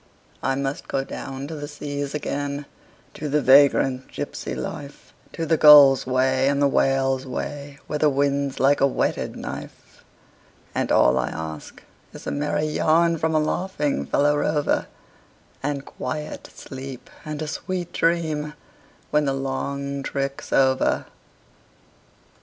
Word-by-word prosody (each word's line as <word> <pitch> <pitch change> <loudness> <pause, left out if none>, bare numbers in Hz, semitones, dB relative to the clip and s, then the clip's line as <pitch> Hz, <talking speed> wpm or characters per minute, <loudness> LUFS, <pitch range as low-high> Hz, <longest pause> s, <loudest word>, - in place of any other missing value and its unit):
I 135 - 0
must 135 0 -3
go 135 - -1
down 135 0 -6
to 155 - -7
the 145 -1 -6
seas 145 -1 -5
again, 145 -1 -3 0.5
to 150 - -5
the 150 +2 +2
vagrant 135 -1 +4
gypsy 65 - -5
life, 140 - -7 0.2
To 165 - -3
the 160 0 +2
gull's 145 -4 +8
way 130 +1 +2
and 140 0 +2
the 140 - +4
whale's 135 -1 +1
way, 140 +2 -5
where 150 - -3
the 150 - +4
wind's 140 0 0
like 140 +2 +3
a 140 - +6
whetted 135 - -1
knife; - - -9 0.7
And - - -1
all 60 - +4
I - - -1
ask 80 -1 -7 0.3
is - - -11
a - - -2
merry 150 +1 -1
yarn 165 +2 +2
from 160 0 0
a - - +4
laughing 155 -2 -1
fellow 145 +1 +2
rover, 150 0 0 0.7
And 140 -1 -3
quiet 150 +4 -6
sleep 130 -2 -9 0.2
and 155 -1 -5
a - - -4
sweet 175 +2 -4
dream 155 -3 0 0.6
when 150 0 +3
the 135 -1 0
long 140 +1 -3
trick's 140 0 -4
over. 130 -1 +2
140 Hz, 140 wpm, -23 LUFS, 135-150 Hz, 0.7 s, gull's